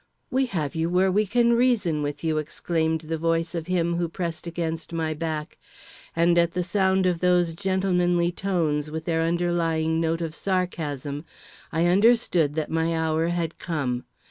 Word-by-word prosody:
"We 265 +1 +2
have 155 - -2
you 160 +1 -1
where 185 +2 +3
we 210 +2 +2
can 235 +3 +3
reason 230 -11 +2
with 145 +1 -4
you," 160 -1 +1
exclaimed 160 +1 -1
the 160 0 -4
voice 165 +1 0
of 165 -1 -4
him 170 -2 +1
who 170 -1 -1
pressed 170 0 -4
against 165 -1 -3
my 160 -1 -1
back; 155 -1 -4 0.6
and 170 +1 +4
at 170 0 +2
the 180 - 0
sound 190 +1 +2
of 180 -2 +1
those 180 -2 +2
gentlemanly 180 -2 +1
tones 165 -6 -1
with 160 +1 -5
their 165 -1 +1
underlying 165 -1 +1
note 165 +1 0
of 165 -2 -3
sarcasm, 160 -6 -2 0.5
I 165 +2 +1
understood 180 -5 +3
that 155 -2 -2
my 165 0 +1
hour 160 0 +1
had 170 -1 -2
come. 135 -8 -2
165 Hz, 170 wpm, -25 LUFS, 160-180 Hz, 0.6 s, and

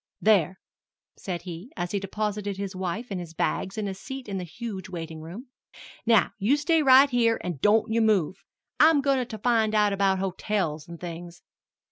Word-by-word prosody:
"There," 190 -4 +3 0.6
said 175 -3 -5
he, 180 - -8
as 175 - -3
he 200 - 0
deposited 205 0 -3
his 195 -1 -5
wife 190 +6 -4
and 190 - -2
his 165 -2 -9
bags 190 +6 -2
in 210 -2 -2
a 195 - -3
seat 265 +7 -8
in 195 -2 -3
the - - -4
huge 190 +1 -7
waiting 165 -3 -7
room; 195 - -9 0.6
"now 225 -3 +4
you 230 +9 +3
stay 320 +2 +2
right 270 0 +7
here, 230 -2 +2
an' 175 -6 -4
don't 220 +2 +3
you 230 - +2
move. 200 -5 +1 0.4
I'm 310 -1 +6
goin' 270 -2 +2
to 220 - -7
find 220 -2 +1
out 210 -1 +3
about 195 -1 +2
hotels 185 -4 -2
and 170 -1 -10
things." 175 0 -8
200 Hz, 185 wpm, -26 LUFS, 180-230 Hz, 0.6 s, right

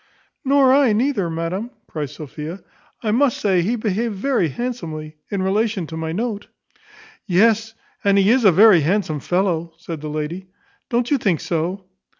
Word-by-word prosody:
"Nor 270 -1 +4
I 270 -5 +4
neither, 220 -5 0
madam," 165 +7 -3 0.2
cries 150 -4 -5
Sophia. 155 +4 -8 0.4
"I 215 - 0
must 255 +2 +2
say 190 -4 +2
he 215 +8 0
behaved 220 0 -1
very 235 -3 +1
handsomely 160 - -5
in 195 -2 -2
relation 205 -1 0
to 160 - -8
my 160 0 -3
note." 210 +2 -3 0.8
"Yes; 220 +4 +3 0.3
and 200 0 +3
he 200 +2 +4
is 255 0 +3
a 200 - +7
very 200 +1 +7
handsome 160 -1 0
fellow," 170 -1 -1
said 165 -2 -7
the 155 - -5
lady: 155 +5 -4 0.4
"don't 240 0 0
you 285 - +3
think 185 -9 +1
so?" 180 +3 -2
195 Hz, 160 wpm, -21 LUFS, 165-230 Hz, 0.8 s, a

